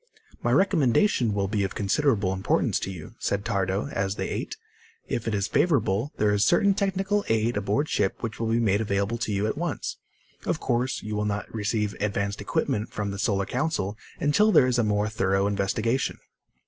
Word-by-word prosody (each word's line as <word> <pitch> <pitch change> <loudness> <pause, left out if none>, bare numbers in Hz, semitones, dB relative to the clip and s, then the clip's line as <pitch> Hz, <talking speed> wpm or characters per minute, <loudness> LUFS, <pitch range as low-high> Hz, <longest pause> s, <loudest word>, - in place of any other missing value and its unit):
"My - - 0
recommendation 135 - +3
will 100 -1 0
be 100 0 0
of 95 - -3
considerable 105 -2 +1
importance 95 0 +1
to - - -4
you," 85 -5 -9
said 100 0 -1
Tardo 100 0 0
as 95 +1 -1
they - - -3
ate. - - -4 0.5
"If 115 - -3
it 110 - 0
is 100 -1 0
favorable, 130 - +1
there 105 -1 +2
is 105 0 +2
certain 195 - +4
technical 195 +1 0
aid 115 +1 +1
aboard 105 +9 0
ship 100 -7 0
which 115 -1 -4
will 115 - -1
be 115 +1 +2
made 105 -2 +2
available 100 +2 -1
to 115 - -2
you 100 +1 0
at 110 +7 -2
once. 170 -5 -3 0.5
Of - - -1
course, 125 +2 -1
you 105 0 -4
will 105 0 -1
not 105 0 -3
receive 105 -1 -1
advanced 100 -1 -1
equipment 105 +1 -1
from 105 -1 -3
the 100 - -6
Solar 100 -3 +1
Council 125 - -1 0.2
until 205 +10 +3
there 130 - +6
is 125 -1 +1
a - - +3
more 105 0 +1
thorough 95 -2 +1
investigation." 105 +5 0
105 Hz, 190 wpm, -26 LUFS, 100-125 Hz, 0.5 s, there